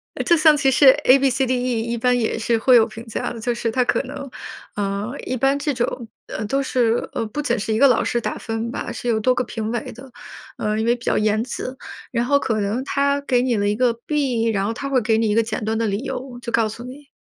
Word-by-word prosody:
呃 - - -2
就 340 - +4
像 310 -1 +5
其 280 -2 +3
实 270 +2 +5 0.2
A-B-C-D-E 255 -3 +2
一 235 +1 -3
般 245 +1 +2
也 225 -1 -1
是 230 +1 +1
会 250 +3 +4
有 225 -2 +6
评 225 0 -10
价 225 - -4
的， 235 - -7
就 240 +2 -1
是 230 -1 -2
他 255 +2 +2
可 - - +1
能， 275 +1 -8 0.5
呃， 205 +3 -2
一 255 - -2
般 270 +3 +2
这 290 0 -1
种， 240 -2 -3 0.2
呃， 215 - -4
都 275 +6 0
是， 240 -3 +1
呃， - - -2
不 295 +8 -4
仅 255 -4 0
是 220 +1 -2
一 215 - 0
个 280 - +7
老 245 - +3
师 240 - 0
打 - - -3
分 225 +1 -4
吧， - - -5
是 - - -6
有 225 -2 +2
多 255 +3 +3
个 250 - -1
评 225 -1 -4
委 240 -1 -4
的， 255 +3 -13 0.5
呃， 215 0 -1
因 220 - 0
为 240 +1 +3
比 235 - -13
较 - - +1
严 215 0 +1
词， 255 +1 -6 0.3
然 235 -1 0
后 280 +2 +3
可 220 -5 -1
能 210 +5 -1
他 280 +1 0
给 255 -3 +1
你 250 -1 +1
了 205 -1 0
一 205 - 0
个 245 +1 +2
B， 245 -1 -1
然 200 -2 0
后 225 - -1
他 275 +4 -5
会 265 -2 +3
给 220 0 +2
你 225 -1 +1
一 210 - +1
个 230 - +4
简 220 -1 -4
短 220 +1 -1
的 225 -1 0
理 200 +1 -1
由， 255 -2 -6
就 235 0 -5
告 230 -2 +2
诉 220 +2 -8
你， 270 +3 -11
240 Hz, 295 characters per minute, -21 LUFS, 225-260 Hz, 0.5 s, 个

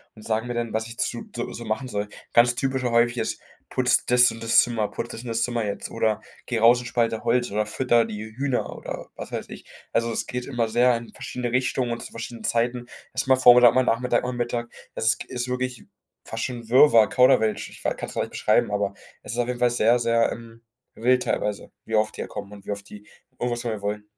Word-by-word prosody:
und 110 - -13
sagen 110 +1 -1
mir 120 - -3
dann, 120 -1 -3
was 110 0 -1
ich 115 +1 -10
zu 120 - -3
so 120 0 -5
machen 110 +4 -2
soll. 105 -2 -2 0.3
Ganz 120 +1 +5
typisch 130 0 -1
häufig 120 0 +2
ist: - - -2 0.3
"Putz - - +2
das 125 0 +5
und 115 - -9
das 115 - +6
Zimmer, 115 -3 -1
putz 120 - -5
das 115 - -7
und - - -8
das 115 0 0
Zimmer 120 -2 -1
jetzt 100 -1 -4
oder 110 -2 0 0.2
geh 120 -3 -1
raus 120 +2 +6
und - - -10
spalte 115 -2 0
Holz 120 0 +1
oder 105 +1 0
fütter 120 +1 +2
die 110 -1 -6
Hühner." 135 -2 -1
oder - - -7
was - - -8
weiß - - -4
ich. - - -10 0.3
Also, 115 0 +1
es - - -2
geht 125 0 -4
immer 120 -4 -1
sehr 120 +2 +4
in 115 0 -10
verschiedene 125 -1 -4
Richtungen 130 -1 0
und 115 - -6
zu - - -10
verschiedenen 115 0 -7
Zeiten. 120 +1 0 0.3
Es - - 0
ist - - -15
mal 130 - +6
Vormittag, 125 -1 +8
mal 130 - +4
Nachmittag, 120 0 +1
mal 125 0 -2
Mittag. 120 -1 -2 0.3
Es 110 -2 +2
g - - -9
ist 125 0 -3
wirklich 125 -1 -3 0.4
fast 115 0 -4
schon 120 -3 -5
Wirrwarr, 120 -3 +7
Kauderwelsch. 110 -4 +3
Ich - - -14
f - - +1
kann - - -6
es - - -10
gar - - 0
nicht - - -8
beschreiben, - - +2
aber 100 -1 -1 0.3
es - - -7
ist 120 - -5
auf 120 -1 +1
jeden 125 -1 -3
Fall 125 0 +4
sehr, 120 0 +3
sehr, 115 0 +2
ähm, 115 0 -12 0.3
wild 125 +2 +2
teilweise, 105 -1 -2
wie 110 - -2
oft 110 0 +1
die - - -4
da - - -4
kommen 100 - -7
und 100 -1 -12
wie - - -4
oft 100 0 -6
die 105 0 -12 0.3
irgendwas 120 -1 -1
von 120 -2 -3
mir 110 -2 -5
wollen. 105 +1 -3
120 Hz, 245 wpm, -24 LUFS, 110-125 Hz, 0.4 s, Vormittag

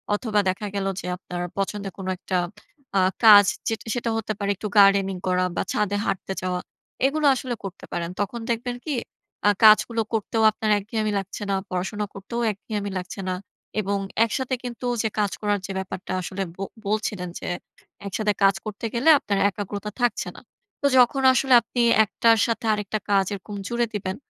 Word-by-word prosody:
অথবা 210 -1 0
দেখা 200 +3 -2
গেল 195 -1 -1 0.2
যে - - -9
আপনার 175 0 -6 0.2
পছন্দের 195 -1 -3
কোনো 190 -1 -4
একটা 185 0 -2 0.6
আ - - +4 0.2
কাজ 205 -2 +10 0.5
সেটা 240 -1 -2
হতে 215 -1 -2
পারে 200 -1 0
একটু 210 - -5
গার্ডেনিং 195 -1 +5
করা 185 0 +2
বা - - 0
ছাদে 205 -1 0
হাঁটতে 190 0 -2
যাওয়া। 180 -1 -1 0.5
এগুলো 305 +2 -1
আসলে 250 -1 -3
করতে 195 -1 -7
পারেন। 170 0 -2
তখন 235 +4 -2
দেখবেন 245 +1 -2
কি 305 - -1 0.5
আ - - +7
কাজগুলো 220 +2 +6
করতেও 220 +1 0
আপনার 215 0 -1
একঘেয়ামি 215 +1 -2
লাগছে 195 +2 -6
না। 195 - +2
পড়াশোনা 190 +3 -2
করতেও 195 +5 -5
একঘেয়ামি 205 0 -5
লাগছে 180 +2 -6
না 185 - 0 0.5
এবং 200 0 -1 0.3
একসাথে 255 +3 -2
কিন্তু 245 0 -6 0.2
যে 220 - 0
কাজ 205 -2 +1
করার 205 -1 +1
যে 195 - -5
ব্যাপারটা 185 -1 -6
আসলে 195 +2 -3
ব - - -23 0.3
বলছিলেন 205 -3 -1
যে - - -5 0.6
একসাথে 210 +1 0
কাজ 195 -1 +5
করতে 215 +1 -5
গেলে 245 +7 +3
আপনার 200 -1 -1
একাগ্রতা 205 +1 -5
থাকছে 245 -1 +1
না। - - -11 0.4
তো 285 - +4
যখন 255 +2 +5
আসলে 265 +1 +2
আপনি 240 +2 -2 0.2
১ 215 - -7
টার 230 -1 +6
সাথে 230 0 -2
আরেকটা 210 +1 -2
কাজ 195 -1 +4
এরকম 200 +1 -7
জুড়ে 240 0 +1
দিবেন 190 -2 -3
205 Hz, 175 wpm, -24 LUFS, 195-225 Hz, 0.6 s, কাজ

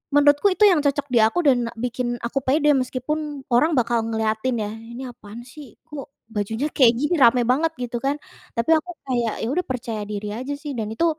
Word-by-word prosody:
menurutku 290 +5 +5
itu 425 - +1
yang 345 -6 +4
cocok 285 0 0
di 235 - +5
aku 225 +11 +2
dan 245 -3 +2
bikin 240 0 -2
aku 260 +4 -1
pede 295 +2 +3
meskipun 275 +2 -3
orang 305 +7 +4
bakal 235 -1 0
ngeliatin 220 +2 -1
ya 210 - -2
"Ini 235 +3 -9
apaan 210 +2 -11
sih, 285 +2 -11 0.2
kok 295 -2 -8 0.2
bajunya 220 +7 -1
kayak 245 -4 +6
gini 295 +5 +1
rame 240 +1 +6
banget?" 320 +5 +1
Gitu 240 0 -3
kan. 280 - +1 0.4
Tapi 230 +4 -1
aku 355 +3 -5 0.2
kayak, 240 -4 0
ya - - -1
udah 360 - 0
percaya 230 -4 -4
diri 210 0 -4
aja 260 +3 -5
sih 295 -1 -6
dan 215 -2 -2
itu 330 +10 0
255 Hz, 200 wpm, -22 LUFS, 230-290 Hz, 0.4 s, kayak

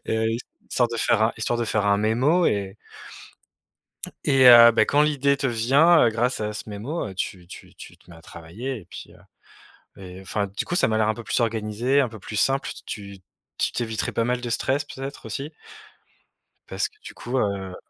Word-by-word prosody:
et 110 - -1
heu, 110 - 0 0.4
histoire 120 -2 +2
de 115 - -5
faire 110 -1 +2
un 110 - +2
histoire 120 +2 -1
de 120 - 0
faire 105 -2 -1
un 100 - +3
mémo 125 - +2
et 100 -4 -1 1.5
et 135 -2 +4
heu, 120 -1 +10
bah, 115 - +3
quand 145 - +3
l'idée 140 -2 +1
te 135 - -1
vient, 135 +8 +4
heu, - - +4
grâce 120 +2 -1
à 105 0 -3
ce 105 - -7
mémo, 110 +9 -4
heu, 95 - -8
tu 90 -1 -5
tu - - -13
tu - - -13
te - - -25
mets 85 - -13
à - - -16
travailler 95 +12 -7
et 85 - -18
puis, - - -11
heu, - - -19 0.8
mais 95 -1 -11
enfin, 100 +2 -3
du 100 - -5
coup, 175 - -3
ça 180 - +3
m'a 110 - 0
l'air 110 -1 +2
un 110 - +1
peu 120 +1 -9
plus - - -1
organisé, 115 +4 0
un 130 - -1
peu 110 -1 -11
plus 105 +3 -8
simple. 135 +6 +1
Tu - - -9 0.3
tu - - -26 0.4
tu - - 0
t'éviterais 110 -2 -3
pas 115 - 0
mal 125 +1 -1
de 120 - -5
stress, 135 +4 0
peut-être, 135 0 -8
aussi 145 +3 -6 1.2
parce - - -2
que, - - -30
du - - -9
coup, 125 +2 -4
heu 100 -4 -2
115 Hz, 220 wpm, -23 LUFS, 105-130 Hz, 1.5 s, heu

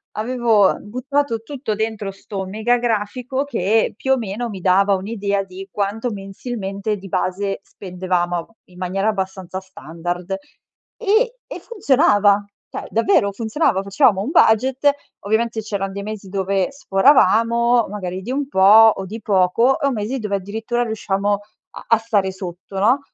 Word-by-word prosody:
Avevo 225 -3 +2
buttato 255 +2 -2
tutto 250 -2 -4
dentro 215 -2 -3
sto 195 0 -6
mega 220 +5 +1
grafico 240 +4 -1
che 220 -4 +1
più 265 - -1
o 265 - +2
meno 225 +2 -4
mi 195 -3 -7
dava 195 +2 +4
un'idea 200 0 -2
di 195 +1 -10
quanto 210 +4 -2
mensilmente 200 0 -4
di 195 0 -10
base 195 +2 -2
spendevamo, 180 -2 -2
ab 170 - -6 0.2
in 180 -1 -19
maniera 190 +3 -1
abbastanza 190 -2 -4
standard. 175 0 -6 0.7
E 460 +4 +2
e - - -7
funzionava, 210 - +3 0.3
cioè - - -6
davvero 230 - +2
funzionava, 220 - 0
facevamo 200 -1 +3
un 260 +9 -3
budget, 260 +5 +4 0.3
ovviamente 220 +2 -1
c'eran 200 -2 -3
dei 200 - -5
mesi 210 -2 -7
dove 195 +3 0
sforavamo, 235 -1 +3
magari 190 -2 -5
di 240 +6 -5
un 280 +1 -1
po', 215 0 +7
o 195 - -5
di 220 +4 -7
poco, 190 +1 +2 0.2
o 280 - +2
mesi 235 +3 -3
dove 210 -3 -2
addirittura 220 +5 -2
riusciamo 205 -2 -1
a 200 - -1 0.5
a 230 - +5
stare 205 -4 0
sotto, 190 +1 -8
no, 245 +7 +4
205 Hz, 150 wpm, -20 LUFS, 195-235 Hz, 0.7 s, po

